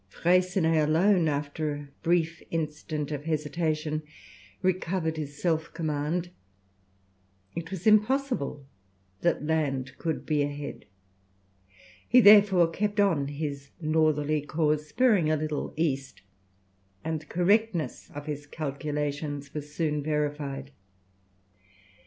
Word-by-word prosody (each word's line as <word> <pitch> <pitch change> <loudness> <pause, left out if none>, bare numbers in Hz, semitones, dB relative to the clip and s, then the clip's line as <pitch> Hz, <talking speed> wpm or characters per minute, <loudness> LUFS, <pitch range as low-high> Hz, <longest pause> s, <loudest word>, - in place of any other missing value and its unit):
Freycinet 175 - +2
alone, 175 +2 +4
after 145 +1 -1
a 145 0 -8
brief 165 -1 +1
instant 155 -2 -3
of 145 0 -4
hesitation, 155 0 -1 0.6
recovered 185 -3 0
his 145 -2 -6
self 160 -2 0
command. 160 +3 -2 1.2
It 165 0 -5
was 190 -2 -6
impossible 215 - +2 0.6
that 170 -3 +1
land 135 -5 -1
could 160 -2 -2
be 150 -2 +1
ahead. 145 0 -4 1.2
He, 250 - +7
therefore, 200 -6 +7
kept 205 +3 -1
on 165 -9 +3
his 140 -1 -5
northerly 155 -2 +2
course, 150 0 0
bearing 220 -11 +3
a 155 - +2
little 155 0 -3
east, 135 -7 -2 0.8
and 160 0 -2
the 155 - -17
correctness 190 0 +1
of 145 0 -6
his 145 -1 -5
calculations 145 -1 -3
was 150 -1 -6
soon 150 -1 -1
verified. 145 -2 -2
155 Hz, 110 wpm, -28 LUFS, 145-170 Hz, 1.2 s, He